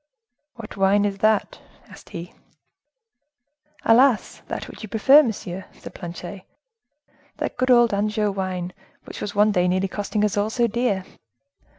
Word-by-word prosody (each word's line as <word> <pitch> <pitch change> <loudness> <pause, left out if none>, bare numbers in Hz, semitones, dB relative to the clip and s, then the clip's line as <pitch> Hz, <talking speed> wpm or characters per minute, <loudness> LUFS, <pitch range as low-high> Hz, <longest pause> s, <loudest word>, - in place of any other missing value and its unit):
"What 225 -3 -10
wine 200 +1 +3
is 200 -1 -2
that?" 215 0 +1 0.3
asked - - -15
he. 170 +1 -8 1.5
"Alas! 240 0 +3
that - - -5
which - - -12
you 215 - -8
prefer, 265 +8 +6
monsieur," 190 -7 -4
said - - -12
Planchet; 175 +2 -8 1.0
"that - - -3
good 255 +1 -1
old 240 -3 +5
Anjou 210 +1 0
wine, 185 -2 -4 0.3
which - - -9
was 205 - -5
one 210 +1 +4
day 180 -2 +2
nearly 185 +2 +1
costing 205 +2 -1
us 205 -1 -1
all 205 +1 +1
so 240 +1 +1
dear." 230 -4 -1
205 Hz, 150 wpm, -23 LUFS, 190-225 Hz, 1.5 s, prefer